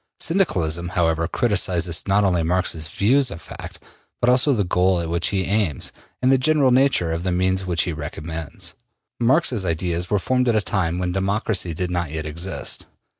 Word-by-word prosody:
Syndicalism, 85 - +1
however, 80 -1 +2
criticises, 90 -7 +1
not 100 +2 +3
only 90 -3 +2
Marx's 80 -2 0
views 125 - +2
of 80 - -7
fact, - - -10 0.4
but 120 - +3
also 130 +3 +3
the 110 -6 +2
goal 90 0 +2
at 85 -1 -3
which 85 +1 +1
he 95 -2 0
aims 95 - -1 0.3
and 130 - +4
the 135 - +4
general 140 -1 +3
nature 130 -10 +3
of 80 0 -2
the 90 +1 -1
means 95 +1 0
which 85 -4 +1
he 85 - -3
recommends. 80 +1 -6 0.5
Marx's 125 - +2
ideas 85 0 -1
were 105 - +2
formed 125 +5 +1
at 115 - +2
a 110 - +3
time 90 -4 -1
when 90 0 -1
democracy 95 -2 -1
did 90 +2 -2
not 85 -3 -1
yet 80 +1 -4
exist. 85 +4 -5
90 Hz, 180 wpm, -22 LUFS, 85-110 Hz, 0.5 s, and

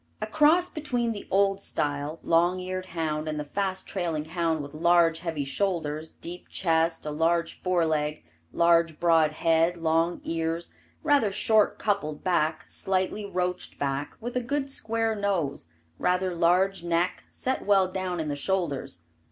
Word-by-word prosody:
A 215 - -2
cross 315 +9 +4
between 250 -8 -2
the 210 - -7
old 195 0 +2
style, 145 -2 -2
long 175 +2 +3
eared 185 0 -4
hound 155 -3 -2
and 155 -1 -2
the - - -2
fast 190 +4 -2
trailing 165 -5 -2
hound 165 -2 -1
with 140 +1 -9
large, 165 0 +3
heavy 165 -4 -3
shoulders, 160 -1 -2
deep 175 +1 -8
chest, 165 -2 +1
a 150 - -3
large 165 +2 +1
fore 180 -2 0
leg, 150 -1 -1 0.3
large 170 -2 +3
broad 165 -3 +4
head, 165 +2 +2
long 165 +1 +1
ears, 165 +1 -2 0.3
rather 285 -9 +3
short 215 +2 +3
coupled 155 -8 -1
back, 160 -3 0
slightly 190 +2 -1
roached 180 -1 -2
back, 140 0 -2
with 240 +2 -6
a 250 - +1
good 275 +3 -2
square 225 -3 -1
nose, 190 - -1 0.3
rather 180 0 +1
large 180 +2 +2
neck, 170 +1 0
set 260 +1 -2
well 195 -2 +4
down 185 -1 -3
in 160 - -2
the 145 - -2
shoulders. 145 - -2
170 Hz, 155 wpm, -27 LUFS, 160-195 Hz, 0.3 s, cross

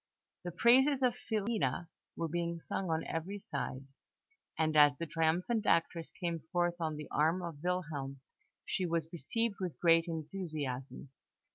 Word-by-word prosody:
The 175 - -3
praises 260 - +5
of 250 -2 +4
Filina 205 - -1 0.3
were 165 - -1
being 170 +1 -2
sung 185 +2 -3
on 160 0 0
every 180 +5 -3
side, 140 -7 -4 0.7
and 155 -1 +1
as 145 -1 +8
the 170 - -3
triumphant 165 +8 +1
actress 165 0 +2
came 170 -3 -1
forth 175 0 +1
on 160 -1 -1
the 150 0 -7
arm 165 +4 +2
of 165 -4 -6
Wilhelm, 150 -7 -2 0.5
she 185 - -1
was 165 0 -1
received 205 - -1
with 180 -4 -4
great 165 0 +5
enthusiasm. 155 -6 -4
170 Hz, 145 wpm, -33 LUFS, 155-185 Hz, 0.7 s, as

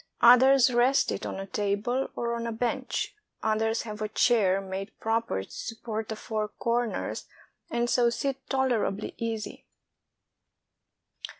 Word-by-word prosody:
Others 250 +1 +7
rest 250 +3 +3
it - - -3
on - - -5
a 195 - -4
table 205 +6 -1
or 235 0 -1
on 235 0 -3
a - - -2
bench; 245 +3 -2 0.3
others 220 +1 +1
have 215 -2 -7
a 215 - 0
chair 210 -4 +3
made 195 +1 -6
proper 225 - 0
to - - -16
support 225 -1 -5
the 220 - -2
four 215 0 -3
corners, 235 +2 -2 0.4
and 235 0 0
so 240 -1 +3
sit 270 +2 -3
tolerably 245 -6 0
easy. 225 -2 -4
230 Hz, 135 wpm, -28 LUFS, 215-245 Hz, 0.4 s, Others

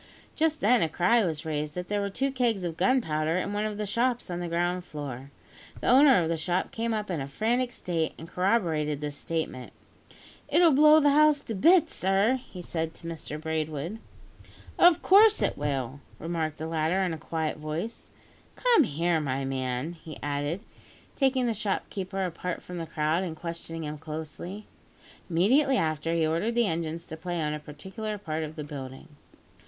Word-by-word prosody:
Just 315 0 +1
then, 240 +3 +4
a 160 - +2
cry 185 +9 +3
was 160 -4 -2
raised 150 -1 -3
that 180 0 -4
there 205 0 0
were 200 - -1
two 270 +7 -1
kegs 240 -7 0
of 170 -2 -3
gunpowder 165 -6 +1
in 200 +2 -2
one 210 +1 -1
of 210 -1 -3
the 210 - -2
shops 235 +1 0
on 175 - -3
the 175 - -3
ground 175 +2 0
floor. 140 -5 -7 0.5
The - - -1
owner 265 -2 +7
of 165 - 0
the 165 0 0
shop 175 +3 -1
came 230 +1 -2
up 210 -3 -2
in 165 -5 -2
a 135 - -4
frantic 240 - 0
state, 165 -8 -2
and 165 - -9
corroborated 165 -6 0
this 145 -1 -4
statement. 155 -6 -4 0.7
"It'll 340 -1 +5
blow 305 +2 +7
the 290 -1 +4
house 300 0 +5
to 225 - -5
bits, 330 - +4
sir," 195 +7 +2
he 180 -2 -8
said 160 -1 -3
to 165 - -9
Mr 155 -2 -6
Braidwood. 160 +4 -3 0.8
"Of 350 -2 +6
course 425 +3 +7
it - - +1
will," 140 -2 -3 0.2
remarked 160 -2 -3
the 155 - -5
latter 165 +4 0
in 180 -3 -1
a 160 - -6
quiet 160 -1 -3
voice. 160 +9 -5 0.5
"Come 475 - +4
here, 165 +1 0
my 135 -2 -2
man," 130 +3 -2
he 160 -2 -10
added, 145 +6 -2 0.5
taking 265 -2 +2
the 235 - +1
shopkeeper 195 -2 -2
apart 180 0 -4
from 180 -1 -7
the 165 - -5
crowd, 155 +3 0
and 170 -4 -4
questioning 165 0 -6
him 150 0 -5
closely. 160 +6 -7 0.6
Immediately 255 - +3
after, 160 -1 0
he 165 -1 +2
ordered 170 +9 0
the 240 -1 +3
engines 165 -2 -3
to 160 - -7
play 175 +1 -4
on 150 -1 -1
a 150 - -4
particular 190 +9 -6
part 160 -5 -4
of 155 0 -6
the 155 - -5
building. 135 -3 -8
170 Hz, 185 wpm, -28 LUFS, 155-215 Hz, 0.8 s, owner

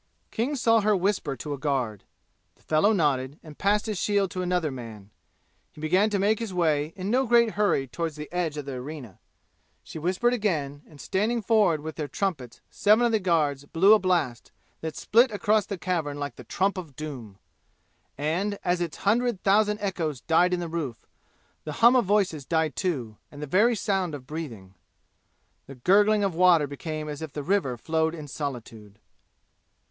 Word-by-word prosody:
King 255 +6 -1
saw 230 -3 +3
her 210 0 +3
whisper 185 -7 -1
to 145 +3 -5
a 140 - -6
guard. 130 -8 -2 0.5
The - - -30
fellow 160 +7 +3
nodded 145 -7 0
and 155 -2 -13
passed 205 +1 +2
his 215 -4 -3
shield 200 -2 +1
to 185 -2 -3
another 180 -4 0
man. 110 -5 -9 0.6
He - - -15
began 185 +7 +2
to 205 - 0
make 205 +2 +2
his 230 -4 -4
way 155 -4 +1
in 195 +2 -4
no 260 +1 +2
great 235 -1 +4
hurry 200 -8 +1
toward 160 +6 -4
the 150 0 -7
edge 170 -4 -1
of 145 - -5
the 140 - -5
arena. 130 - -8 0.6
She - - -8
whispered 190 +9 +1
again 155 - -1
and 150 -3 -17
standing 220 +8 -1
forward 205 -9 +3
with 160 +1 -7
their 150 -2 -3
trumpets 145 - -4
seven 215 +4 +4
of 235 - +2
the 220 - +2
guards 150 -7 0
blew 185 +8 +5
a 215 - +5
blast 175 - -1 0.3
that 160 -2 -5
split 235 - +3
across 210 0 +1
the 200 - -4
cavern 165 -6 -2
like 145 0 -5
the - - -12
trump 195 +1 0
of 155 -7 -10
doom; 125 -10 -8 0.8
and 175 +8 -1
as 175 0 +1
its 170 -3 -3
hundred 230 -1 +1
thousand 210 +1 +3
echoes 165 -9 -2
died 175 +2 +3
in 180 - 0
the 175 - -4
roof, 155 -8 -5 0.6
the 155 - -5
hum 235 - +5
of 250 - +3
voices 185 -7 +1
died, 160 +1 0
too, 130 - -3
and 145 - -11
the 150 - -4
very 210 - +3
sound 190 -6 -1
of 130 -3 -10
breathing. 125 - -7 0.9
The 135 - -10
gurgling 205 - +3
of 195 -3 0
water 170 -3 +5
became 155 +2 -6
as 150 0 -6
if 160 -3 -7
the 145 - -4
river 165 -8 0
flowed 160 +5 -1
in 155 -3 -8
solitude. 115 -8 -7
165 Hz, 185 wpm, -26 LUFS, 145-205 Hz, 0.9 s, blew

